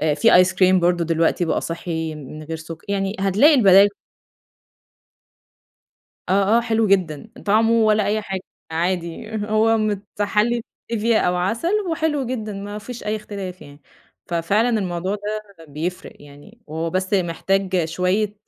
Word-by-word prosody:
في 180 Hz, +4 st, +6 dB
Ice -, -, 0 dB
Cream 185 Hz, 0 st, +4 dB
برضه 175 Hz, 0 st, +2 dB
دلوقتي 165 Hz, +1 st, +1 dB
بقى 160 Hz, -, 0 dB
صحي 165 Hz, -1 st, -4 dB
من 150 Hz, +1 st, -9 dB
غير 160 Hz, +1 st, -5 dB
سك 160 Hz, +1 st, -9 dB
يعني 195 Hz, 0 st, -1 dB
هتلاقي 200 Hz, -, +4 dB
البداي 200 Hz, -6 st, +7 dB, 2.4 s
آه، 200 Hz, +3 st, +3 dB
آه، 235 Hz, -, +4 dB
حلو 225 Hz, -1 st, +1 dB
جدًا، 185 Hz, -2 st, 0 dB, 0.2 s
طعمه 220 Hz, +2 st, +3 dB
ولا 215 Hz, -2 st, +3 dB
أي 215 Hz, +1 st, +1 dB
حاجة 195 Hz, -2 st, -4 dB, 0.3 s
عادي، 170 Hz, +4 st, -2 dB, 0.2 s
هو 220 Hz, +1 st, +3 dB
متحلي 210 Hz, +2 st, 0 dB, 0.3 s
بStevia 230 Hz, +1 st, +1 dB
أو 180 Hz, -3 st, +2 dB
عسل 225 Hz, -, -1 dB, 0.2 s
وحلو 310 Hz, -4 st, -1 dB
جدًا 220 Hz, -4 st, -4 dB
ما 205 Hz, +1 st, -6 dB
فيش 240 Hz, +3 st, -9 dB
أي 210 Hz, +1 st, -1 dB
اختلاف 200 Hz, -4 st, -7 dB
يعني، 145 Hz, 0 st, -14 dB, 0.5 s
ففعلًا 175 Hz, +7 st, +1 dB
الموضوع 190 Hz, -4 st, -1 dB
ده 210 Hz, -3 st, -6 dB
بيفرق 160 Hz, +5 st, -5 dB
يعني، 145 Hz, +11 st, -16 dB
هو 160 Hz, +2 st, -3 dB
بس 185 Hz, +3 st, -2 dB
محتاج 185 Hz, 0 st, 0 dB
شوية 185 Hz, +6 st, 0 dB
195 Hz, 140 wpm, -21 LUFS, 170-215 Hz, 2.4 s, البداي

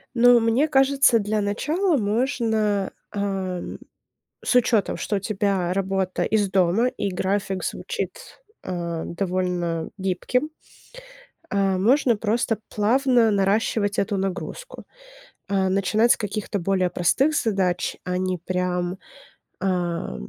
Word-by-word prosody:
Ну, 245 Hz, 0 st, +6 dB
мне 230 Hz, +7 st, +2 dB
кажется, 270 Hz, -4 st, +4 dB
для 210 Hz, +1 st, -1 dB
начала 305 Hz, -, 0 dB
можно, 215 Hz, -3 st, 0 dB, 0.2 s
эм, 190 Hz, -3 st, -3 dB, 0.7 s
с -, -, +1 dB
учётом, 230 Hz, -4 st, +2 dB
что 210 Hz, -, -2 dB
у -, -, +1 dB
тебя 195 Hz, -3 st, -1 dB
работа 190 Hz, -1 st, -1 dB
из 210 Hz, -3 st, +1 dB
дома 190 Hz, +5 st, +3 dB
и 205 Hz, -4 st, -3 dB
график 190 Hz, 0 st, -1 dB
звучит, -, -, -5 dB, 0.2 s
э, 170 Hz, -2 st, -3 dB
довольно 175 Hz, -2 st, -2 dB
гибким. 195 Hz, -, -1 dB, 1.0 s
А, 195 Hz, -2 st, +1 dB
можно 240 Hz, +5 st, +3 dB
просто 225 Hz, +1 st, 0 dB
плавно 240 Hz, +1 st, +3 dB
наращивать 205 Hz, +1 st, +1 dB
эту 200 Hz, 0 st, 0 dB
нагрузку, 195 Hz, -, -5 dB, 0.6 s
а, 195 Hz, -1 st, +1 dB
начинать 200 Hz, +5 st, +3 dB
с -, -, +1 dB
каких-то 210 Hz, -1 st, -3 dB
более 185 Hz, 0 st, 0 dB
простых 270 Hz, -, +2 dB
задач. 185 Hz, -5 st, 0 dB
А 180 Hz, 0 st, -2 dB
не 185 Hz, -1 st, -1 dB
прям, 180 Hz, +1 st, -2 dB, 0.6 s
ам, 175 Hz, -, -2 dB
200 Hz, 115 wpm, -23 LUFS, 185-230 Hz, 1.0 s, Ну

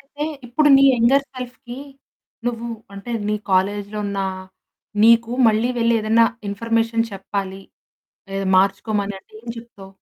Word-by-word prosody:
అయితే 290 Hz, +2 st, -6 dB, 0.2 s
ఇప్పుడు 295 Hz, +5 st, +2 dB
నీ 275 Hz, -, +5 dB
యంగర్ 250 Hz, +4 st, +3 dB
సెల్ఫ్‌కి, 250 Hz, 0 st, -8 dB, 0.7 s
నువ్వు 235 Hz, 0 st, -2 dB, 0.3 s
అంటే, 200 Hz, +5 st, -8 dB, 0.2 s
నీ 210 Hz, -, +1 dB
కాలేజులో 200 Hz, +2 st, 0 dB
ఉన్న 200 Hz, -1 st, -2 dB, 0.8 s
నీకు 230 Hz, 0 st, +5 dB, 0.2 s
మళ్ళీ 220 Hz, +2 st, +2 dB
వెళ్లి 230 Hz, 0 st, +3 dB
ఏదన్నా 225 Hz, +2 st, +4 dB, 0.2 s
ఇన్ఫర్మేషన్ 230 Hz, +2 st, 0 dB
చెప్పాలి, 195 Hz, 0 st, -5 dB, 0.7 s
లేదా 195 Hz, 0 st, -2 dB
మార్చుకోమని 200 Hz, +1 st, +1 dB
అంటే -, -, -31 dB
ఏం 240 Hz, -, -8 dB
చెప్తావు? 230 Hz, -4 st, -12 dB
225 Hz, 125 wpm, -21 LUFS, 200-235 Hz, 0.8 s, నీ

